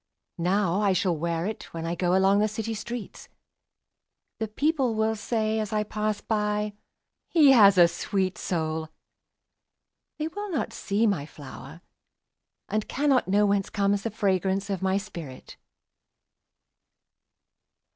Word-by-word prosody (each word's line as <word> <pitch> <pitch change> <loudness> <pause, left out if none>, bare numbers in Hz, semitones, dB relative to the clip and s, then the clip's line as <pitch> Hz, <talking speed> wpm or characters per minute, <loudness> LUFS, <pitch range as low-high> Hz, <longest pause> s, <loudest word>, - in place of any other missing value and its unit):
Now 190 +2 +1
I 200 -2 +3
shall 185 -2 +1
wear 165 +1 -2
itWhen 170 -6 -5
I 170 +1 -2
goAlong 190 +3 +3
the 210 - +3
city 225 +1 -4
streets:The 225 0 -10
people 270 +1 0
will 220 0 +1
sayAs 220 -1 -1
I 210 -1 +1
pass 210 0 -2
by—"He 210 +8 0
has 200 -6 +7
a 175 -1 +8
sweet 190 +1 -2
soul!"They 160 - -7
will 410 +4 -6
not 320 -7 -2
see 205 +3 0
my 175 -9 0
flower, 145 +2 -11 0.9
And 215 0 -2
cannot 275 -4 +2
knowWhence 200 0 +2
comes 200 0 +1
the 230 - -2
fragrance 195 -1 0
of 190 - -2
my 190 0 +1
spirit! 170 -10 -8
205 Hz, 115 wpm, -26 LUFS, 185-220 Hz, 0.9 s, a